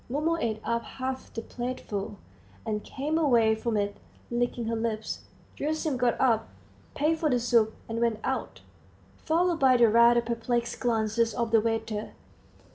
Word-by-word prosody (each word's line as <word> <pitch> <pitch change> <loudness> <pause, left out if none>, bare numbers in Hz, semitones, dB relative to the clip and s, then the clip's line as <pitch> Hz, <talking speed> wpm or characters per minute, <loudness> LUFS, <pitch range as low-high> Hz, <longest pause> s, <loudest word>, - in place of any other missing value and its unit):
Mumu 305 +6 +1
ate 220 -2 -1
up 230 +1 0
half 260 0 -5
the 225 - -5
plateful, 225 -5 -5 0.5
and 210 -1 -2
came 300 +4 -2
away 235 -8 +4
from 220 0 -1
it, 205 0 -1 0.3
licking 240 0 -1
her 230 +1 -1
lips. 225 -1 -3 0.3
Gerasim 310 -1 -1
got 245 -2 +1
up, 235 -4 +3 0.5
paid 315 +3 +1
for 310 - +1
the 250 -3 +2
soup, 230 -2 +2
and 230 +1 -3
went 230 -2 +1
out, - - -3 0.6
followed 340 +1 +1
by 260 -2 +5
the 235 -2 +6
rather 235 +2 +6
perplexed 235 0 -2
glances 225 -1 +1
of 235 -1 -1
the 225 -1 +5
waiter. 225 -1 -2
235 Hz, 155 wpm, -28 LUFS, 225-260 Hz, 0.6 s, the